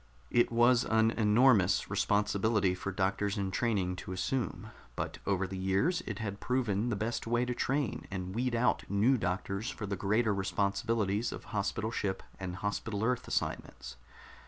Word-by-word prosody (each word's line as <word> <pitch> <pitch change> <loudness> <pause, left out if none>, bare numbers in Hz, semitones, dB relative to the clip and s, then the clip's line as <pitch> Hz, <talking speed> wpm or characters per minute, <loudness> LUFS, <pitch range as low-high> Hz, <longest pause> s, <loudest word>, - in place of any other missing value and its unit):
It 120 - +3
was 120 +1 +5
an 110 0 +3
enormous 110 -2 +4
responsibility 105 -1 +1
for 95 +2 -4
doctors 100 +2 0
in 95 -1 -1
training 95 -5 0
to - - -7
assume, 115 +3 -2 0.2
but - - -4
over 95 -1 +1
the 95 0 -5
years 100 - +1
it - - -3
had 100 -3 -4
proven 120 -3 0
the 115 - 0
best 110 +3 -3
way 120 +1 +2
to 125 - -2
train 135 -1 -1
and 95 -1 -4
weed 120 +2 0
out 115 +2 +2
new 105 +7 +3
doctors 100 +2 -2
for 115 -7 -5
the 100 0 -2
greater 105 +3 +1
responsibilities 100 +2 0
of - - -7
hospital 110 +2 -1
ship 100 -4 -2 0.2
and 90 -2 -4
Hospital 100 +1 -3
Earth 125 +1 0
assignments. - - -3
105 Hz, 160 wpm, -31 LUFS, 95-120 Hz, 0.2 s, was